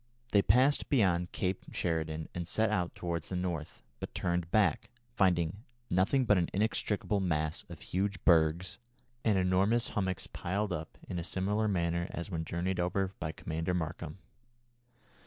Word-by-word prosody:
They 100 - +6
passed 130 +9 +3
beyond 90 -9 +2
Cape 95 0 -1
Sheridan 80 -2 -1
and 85 -2 -4
set 110 +3 +2
out 90 -4 0
towards 85 -2 -3
the 95 - -3
North, 85 -4 -3 0.2
but - - -7
turned 85 -1 -1
back, 95 -6 +2 0.3
finding 90 -3 +2 0.3
"nothing 100 +9 +3
but 105 -4 +5
an 85 - 0
inextricable 105 0 0
mass 80 -4 -1
of - - -9
huge 100 +2 -2
bergs, 85 +3 +3 0.4
and 105 -3 +3
enormous 95 +6 +2
hummocks 95 -4 -1
piled 100 +2 -2
up 80 -1 -5
in 90 - -3
a - - -3
similar 100 +5 0
manner 85 -3 0
as 85 +3 -5
when 80 -2 -2
journeyed 90 +3 -2
over 95 +2 0
by 80 0 -2
Commander 80 +3 -2
Markham." 80 -1 -4
90 Hz, 155 wpm, -32 LUFS, 85-100 Hz, 0.4 s, They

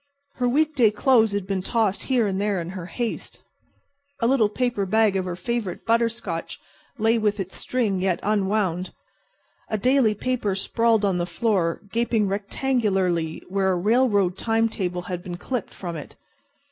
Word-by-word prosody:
Her 245 -1 +1
week 305 +4 +2
day 235 -6 +5
clothes 225 0 +3
had 200 -2 -2
been 195 -1 -2
tossed 215 -1 0
here 250 -4 +2
and 195 -1 -1
there 205 -2 0
in 170 0 -5
her 180 -2 -6
haste. 235 +3 -5 0.8
A 230 - 0
little 235 -4 +3
paper 235 -3 -1
bag 220 0 +3
of 190 -1 0
her 180 -1 -3
favorite 205 0 -3
butter 230 0 +3
scotch 195 -8 -6 0.4
lay 225 +1 +2
with 210 -1 0
its 190 -1 -4
string 220 -7 -1
yet 185 -2 +1
unwound. 195 -3 0 0.8
A 215 - 0
daily 250 -1 +3
paper 225 -3 -1
sprawled 225 +2 +2
on 190 -3 +1
the 175 0 -1
floor, 180 -2 0
gaping 230 -2 +1
rectangularly 195 -5 0
where 190 0 +1
a 180 - +1
railroad 205 -2 +2
time 225 0 +2
table 180 -4 -3
had 180 -1 -5
been 175 -1 -6
clipped 250 +4 -4
from 175 -3 -6
it. 150 - -8
205 Hz, 170 wpm, -24 LUFS, 185-230 Hz, 0.8 s, day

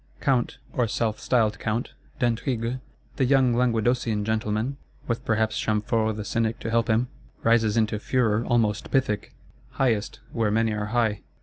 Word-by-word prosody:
Count, 130 -2 +1 0.2
or 120 -2 +1
self 110 -2 -1
styled 110 -3 +1
Count, 115 +2 -2 0.2
d'Aintrigues, 120 +1 -1 0.4
"the 130 - +3
young 130 -2 +4
Languedocian 120 -2 +1
gentleman," 110 +4 -1 0.3
with 115 -1 -2
perhaps 110 -1 +1
Chamfort 110 +1 0
the 105 -1 -5
Cynic 115 -1 0
to 115 - -3
help 115 +1 +2
him, 115 +3 +2 0.4
rises 115 -1 +3
into 110 -1 +1
furor 115 -2 +1
almost 115 -3 +1
Pythic; 130 -6 0 0.4
highest, 115 -6 0
where 115 -3 +1
many 110 +1 +2
are 105 0 -2
high. 110 -3 +1
115 Hz, 145 wpm, -25 LUFS, 110-120 Hz, 0.4 s, young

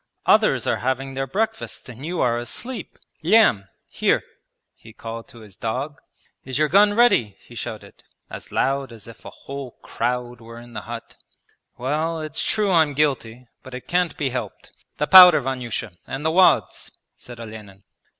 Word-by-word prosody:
'Others - - +3
are - - +1
having 130 +2 -2
their 135 0 -3
breakfast 220 - -3
and 125 +1 -11
you 175 +3 -4
are 120 -1 +1
asleep! 230 - -6 0.2
Lyam! 165 - +4 0.2
Here!' - - +1 0.5
he 110 - -16
called 115 0 -8
to 115 - -15
his 105 -4 -14
dog. 130 +8 -4 0.4
'Is 130 0 -4
your 155 0 +2
gun 205 +1 +5
ready?' 125 - +3
he - - -15
shouted, - - -8 0.2
as - - -10
loud 135 -1 0
as 115 -1 -13
if 115 - -14
a - - -7
whole 140 -3 -9
crowd 125 -1 -3
were 115 +1 -11
in 120 0 -13
the - - -5
hut. - - -8 0.6
'Well, 155 +6 -2
it's 155 0 -5
true 210 -2 0
I'm 160 -5 +3
guilty, 125 -5 -1 0.2
but 130 -1 -10
it 125 - -9
can't 180 -1 0
be 140 -4 -1
helped! 120 -5 -6 0.3
The 150 - 0
powder, 180 -1 +10
Vanyusha, 130 -6 -4 0.2
and 135 +3 -5
the 160 - +2
wads!' 185 +3 +3 0.3
said 120 -1 -13
Olenin. 105 -3 -11
130 Hz, 170 wpm, -22 LUFS, 115-160 Hz, 0.6 s, powder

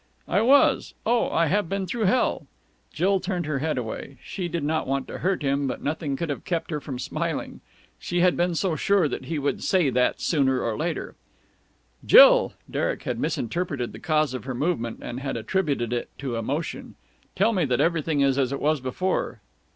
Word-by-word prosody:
"I 200 - +2
was. 270 +5 +4
Oh, 235 +1 +2
I 165 - +2
have 185 +2 0
been 195 -1 -1
through 220 +4 -2
hell!" 245 +6 +1 0.4
Jill 195 +2 +1
turned 180 -2 -3
her 150 -2 -1
head 155 0 -1
away. 125 +3 -5
She 185 -3 -4
did 170 -2 -3
not 155 +2 -1
want 135 0 -1
to - - -6
hurt 185 -2 0
him, 140 0 +1
but 130 - -4
nothing 145 -1 -2
could 160 +2 -3
have 140 - -5
kept 170 -1 -3
her 150 -1 -2
from 135 -4 -6
smiling. 125 - -4 0.4
She 175 - -2
had 180 0 +4
been 175 0 0
so 175 -1 0
sure 195 -1 +2
that - - -5
he 165 - -3
would 145 0 -1
say 175 -8 +2
that 125 0 +1
sooner 135 -5 +2
or 115 -2 -1
later. 165 +5 -3 0.9
"Jill!" - - +7
Derek - - -2
had - - -3
misinterpreted 140 -1 -2
the - - -9
cause 155 -4 +1
of 130 - -6
her 130 -2 -4
movement, 125 -5 -2
and 120 +1 -5
had 135 -2 -3
attributed 135 - -1
it 120 - -3
to 130 -4 -4
emotion. 140 +8 -4 0.4
"Tell 220 +4 +3
me 185 -4 +1
that 125 -3 0
everything 160 -3 +1
is 135 0 +3
as 130 -1 +1
it 140 - -2
was 150 -1 +1
before." 180 +9 -2
155 Hz, 195 wpm, -25 LUFS, 135-180 Hz, 0.9 s, Jill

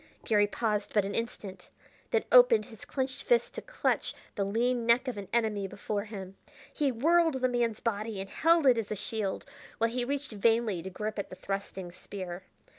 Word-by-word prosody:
Garry 210 -3 +4
paused 210 -1 -1
but 205 -2 +4
an 200 - -3
instant, 215 -4 -5 0.4
then - - +2
opened - - +7
his 225 -4 -12
clenched 260 -1 -3
fists 485 -1 +2
to - - -6
clutch - - -1 0.2
the 200 - -1
lean 235 +4 +1
neck 245 +3 +4
of 250 - -2
an 200 -2 -6
enemy 215 -4 +1
before 200 +1 -3
him. 195 -3 -8 0.4
He 290 -3 +1
whirled 325 +5 +3
the 255 -1 +2
man's 235 -3 0
body 215 -2 -2
and 195 - -4
held 330 - +3
it 250 -3 +6
as 215 -2 -4
a - - 0
shield 205 -1 -3 0.3
while 230 0 +1
he 245 +1 -1
reached 280 +1 -3
vainly 220 -3 +2
to 190 - -6
grip 210 +3 -4
at 200 - -4
the - - -8
thrusting 190 -1 -5
spear. 185 -1 -7
220 Hz, 190 wpm, -30 LUFS, 200-250 Hz, 0.4 s, opened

